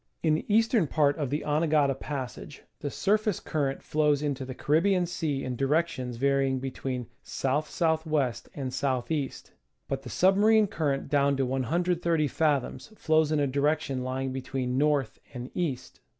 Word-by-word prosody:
In 160 -2 +3
the 155 - -2
eastern 225 -4 +3
part 145 -1 +2
of 145 -4 -1
the 150 +3 -2
Anegada 150 -2 +2
Passage 135 0 -6 0.2
the 145 - -3
surface 210 +4 +1
current 140 -3 -2
flows 150 -1 +1
into 140 -3 -2
the 130 -1 -7
Caribbean 175 +6 +2
Sea 150 -5 -2
in 130 -1 -3
directions 135 -3 0
varying 135 0 +2
between 130 -1 -4 0.2
S. - - -6
S. 145 +4 0
W. 160 -5 +2 0.2
and 135 -3 -3
S. 130 +2 -5 0.3
E., 145 -4 0 0.6
but 135 -1 -3
the 130 - -9
submarine 210 - +4
current 145 -8 -1
down 140 -1 +2
to 135 - +1
130 165 +5 0
fathoms 150 - -1
flows 155 -5 +2
in 155 - +2
a 145 - +2
direction 140 -1 0
lying 130 +1 -2
between 130 -1 -3
north 145 -5 +1 0.2
and 125 +1 -6
east. 155 -8 -3
145 Hz, 160 wpm, -28 LUFS, 135-160 Hz, 0.6 s, submarine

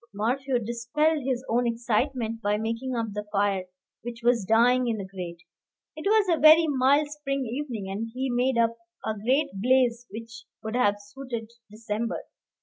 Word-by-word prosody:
Morphew 255 +5 0
dispelled 245 +7 0
his 255 0 -2
own 240 +1 +1
excitement 230 0 -1
by 205 0 +1
making 230 +4 -3
up 225 -3 -2
the 210 0 -5
fire, 200 -2 +1 0.4
which 235 0 -7
was 235 -4 +3
dying 245 +4 +4
in 225 -2 0
the 200 - -5
grate. 175 -3 -8 0.5
It 310 +4 -4
was 425 -1 +4
a 335 -4 +2
very 315 +2 +8
mild 285 +1 +3
spring 275 -2 -3
evening, 240 -4 -4
and 205 +4 -4
he 260 +3 -2
made 250 +1 +1
up 230 0 +2 0.3
a 220 - 0
great 260 +8 +1
blaze 240 +3 +2
which 230 +3 -9 0.2
would 220 0 -4
have 205 -5 +3
suited 225 +2 -7 0.2
December. 215 +1 -3
235 Hz, 165 wpm, -26 LUFS, 220-265 Hz, 0.5 s, very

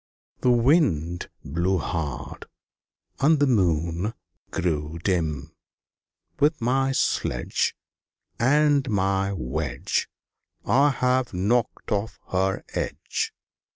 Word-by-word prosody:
The 125 - +2
Wind 115 - +2 0.2
blew 85 +6 0
hard, 80 -5 -4 0.7
and 155 +3 +5
the 145 - +4
Moon 90 - +1 0.3
grew 80 -2 -2
dim. 80 -6 -1 0.9
"With 150 +1 +3
my 135 +3 +1
sledge - - 0 0.6
And 145 +2 +3
my 95 -1 +1
wedge 75 -5 -2 0.6
I 140 +4 +4
have 125 -4 +1
knocked 110 +7 0
off 105 +1 -1
her 95 +1 0
edge! - - -2
95 Hz, 90 wpm, -25 LUFS, 85-130 Hz, 0.9 s, and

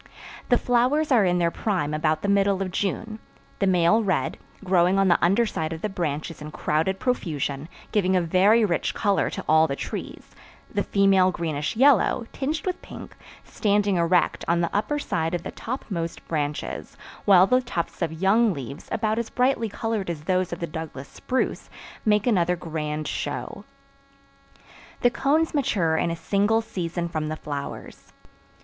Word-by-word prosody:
The 245 - +5
flowers 255 +6 +1
are 230 -6 +5
in 180 -1 +2
their 170 -1 +1
prime 180 -10 -1
about 155 0 0
the - - 0
middle 200 -1 +2
of 185 - -5
June; 215 +4 -3 0.4
the 195 - +2
male 185 +4 +4
red, 185 -10 -1 0.2
growing 185 0 +3
on 195 -1 +3
the 170 - +3
underside 180 -4 +1
of 160 - -8
the 215 - 0
branches 160 -4 -4
in 150 - -6
crowded 160 +5 -1
profusion, 155 - -2 0.2
giving 190 -3 +2
a 180 - +3
very 195 +7 +4
rich 175 -4 -1
color 200 -2 +1
to - - -6
all 160 +1 +5
the 140 - -2
trees; - - -7 0.4
the - - +1
female 195 -2 +3
greenish 155 -2 -3
yellow, 260 -1 +4
tinged 295 +3 -3
with 365 -1 -2
pink, - - -10 0.3
standing 205 -3 +1
erect 170 +1 +2
on 170 0 +2
the 170 +1 -1
upper 215 +8 0
side 165 - -1
of 175 - -4
the - - -5
topmost 190 -9 -5
branches, 150 -2 -3 0.3
while 190 -3 +7
the 255 +5 +3
tufts 215 -10 -4
of 165 -2 0
young 195 +5 +2
leaves, 140 +3 -8
about 220 +1 0
as 235 - -3
brightly 250 -3 +1
colored 220 -2 -3
as 165 -3 -4
those 185 +1 0
of 175 - -5
the 170 - -2
Douglas 155 -4 -7
spruce, 260 - -2 0.4
make 210 -1 +3
another 180 -7 +2
grand 155 -3 -4
show. - - -4 1.4
The 245 - +4
cones 310 +6 +1
mature 190 - +1
in 165 - +1
a 165 - -2
single 205 +5 +1
season 175 -5 -4
from 155 -2 -3
the 155 - -3
flowers. 145 -2 -7
185 Hz, 170 wpm, -24 LUFS, 165-220 Hz, 1.4 s, while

